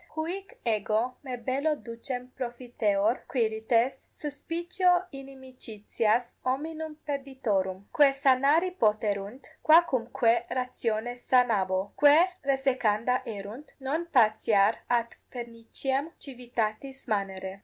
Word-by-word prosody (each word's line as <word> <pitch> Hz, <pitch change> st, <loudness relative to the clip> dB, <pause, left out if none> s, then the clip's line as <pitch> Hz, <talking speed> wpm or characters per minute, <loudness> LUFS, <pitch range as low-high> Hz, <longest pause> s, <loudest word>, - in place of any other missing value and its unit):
Huic 355 Hz, +5 st, -5 dB
ego 220 Hz, +2 st, 0 dB
me 260 Hz, -3 st, -4 dB
bello 275 Hz, +6 st, 0 dB
ducem 250 Hz, 0 st, -6 dB
profiteor, 240 Hz, -3 st, -1 dB
Quirites, 230 Hz, +2 st, 0 dB
suscipio 345 Hz, +4 st, 0 dB
inimicitias 255 Hz, -4 st, -3 dB
hominum 310 Hz, +4 st, -3 dB
perditorum: 230 Hz, -10 st, -2 dB
quae 290 Hz, -2 st, +5 dB
sanari 275 Hz, +6 st, +3 dB
poterunt, 215 Hz, -, -1 dB, 0.2 s
quacumque 255 Hz, -8 st, +3 dB
ratione 245 Hz, -2 st, -2 dB
sanabo; 205 Hz, -7 st, +2 dB
quae 295 Hz, +5 st, +6 dB, 0.2 s
resecanda 255 Hz, -3 st, +1 dB
erunt, 220 Hz, +6 st, -8 dB
non 300 Hz, +6 st, -2 dB
patiar 215 Hz, -6 st, +4 dB
ad 235 Hz, -1 st, 0 dB
perniciem 245 Hz, +4 st, -3 dB
civitatis 250 Hz, 0 st, -4 dB
manere. 195 Hz, -3 st, -3 dB
250 Hz, 90 wpm, -28 LUFS, 220-275 Hz, 0.2 s, quae